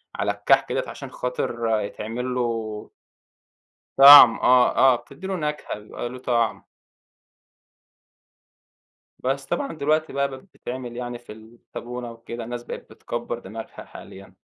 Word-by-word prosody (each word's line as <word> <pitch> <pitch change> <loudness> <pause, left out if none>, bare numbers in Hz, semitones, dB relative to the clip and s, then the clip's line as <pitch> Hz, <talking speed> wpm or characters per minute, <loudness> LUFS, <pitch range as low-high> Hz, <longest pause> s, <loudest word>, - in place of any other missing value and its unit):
على - - 0
الكَحك - - +2
ديّة - - 0
عشان - - -9
خاطر 120 -3 -2
يتعمل 115 +5 -5
له 115 -3 -3 1.1
طعم 135 -4 +11
آه 125 -1 +4
آه. 130 -2 +6
بتدّي 140 +9 -10
له 190 - -2
نكهة، 150 - -4
بيبقى 110 +3 -7
له 130 - -9
طعم. 115 -4 -1 2.6
بس 135 +1 -2
طبعًا 280 - -3
دلوقتي 155 +1 0
بقى 140 0 +1
بقت 135 -1 -9
بتتعمل 125 -9 -8
يعني 120 -1 -5
في 120 - -14
الطابونة 120 +2 -9
وكده، 115 0 -8
الناس 120 +1 -6
بقت - - -9
بتكبَّر 120 0 -5
دماغها 110 +1 -10
حاليًا. 95 0 -13
120 Hz, 130 wpm, -23 LUFS, 115-135 Hz, 2.6 s, طعم